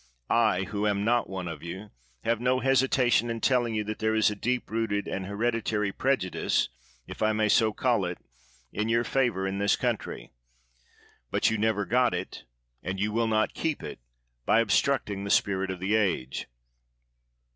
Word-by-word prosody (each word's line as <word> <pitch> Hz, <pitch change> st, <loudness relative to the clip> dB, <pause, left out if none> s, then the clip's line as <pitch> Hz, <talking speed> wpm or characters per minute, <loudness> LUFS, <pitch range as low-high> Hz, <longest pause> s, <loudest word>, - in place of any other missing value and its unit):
I, 110 Hz, -5 st, +3 dB
who 105 Hz, +1 st, -2 dB
am 100 Hz, 0 st, 0 dB
not 120 Hz, +1 st, +2 dB
one 95 Hz, -2 st, -4 dB
of 85 Hz, -, -6 dB
you, 95 Hz, +5 st, -8 dB, 0.3 s
have 115 Hz, 0 st, 0 dB
no 130 Hz, +1 st, +2 dB
hesitation 130 Hz, -3 st, +3 dB
in 115 Hz, 0 st, -3 dB
telling 120 Hz, -2 st, +1 dB
you 105 Hz, -, 0 dB
that 105 Hz, +1 st, -5 dB
there 110 Hz, 0 st, +1 dB
is 110 Hz, -1 st, +3 dB
a -, -, -4 dB
deep 125 Hz, +4 st, -2 dB
rooted, 110 Hz, -2 st, -1 dB
an 95 Hz, -, -3 dB
hereditary 105 Hz, 0 st, -1 dB
prejudice, 125 Hz, -4 st, 0 dB, 0.4 s
if -, -, -10 dB
I 110 Hz, 0 st, +3 dB
may 110 Hz, 0 st, +1 dB
so 110 Hz, +1 st, +4 dB
call 115 Hz, -3 st, +1 dB
it, 90 Hz, 0 st, -4 dB, 0.6 s
in 105 Hz, +2 st, -1 dB
your 115 Hz, +1 st, +2 dB
favor 120 Hz, -8 st, 0 dB
in 95 Hz, +1 st, -2 dB
this 100 Hz, 0 st, +3 dB
country. -, -, -3 dB, 1.0 s
But -, -, +2 dB
you 110 Hz, -, 0 dB
never 105 Hz, -2 st, +1 dB
got 120 Hz, +1 st, +2 dB
it, 90 Hz, -9 st, -6 dB, 0.4 s
and 95 Hz, +2 st, -4 dB
you 105 Hz, +2 st, 0 dB
will 115 Hz, +1 st, +1 dB
not 110 Hz, -1 st, +1 dB
keep 160 Hz, -3 st, -2 dB
it, -, -, -7 dB, 0.4 s
by 110 Hz, -, +4 dB
obstructing 105 Hz, -2 st, +1 dB
the 100 Hz, -, -4 dB
spirit 95 Hz, -1 st, +2 dB
of 95 Hz, -1 st, -4 dB
the 95 Hz, +3 st, -1 dB
age. 90 Hz, -12 st, 0 dB
110 Hz, 180 wpm, -27 LUFS, 100-115 Hz, 1.0 s, so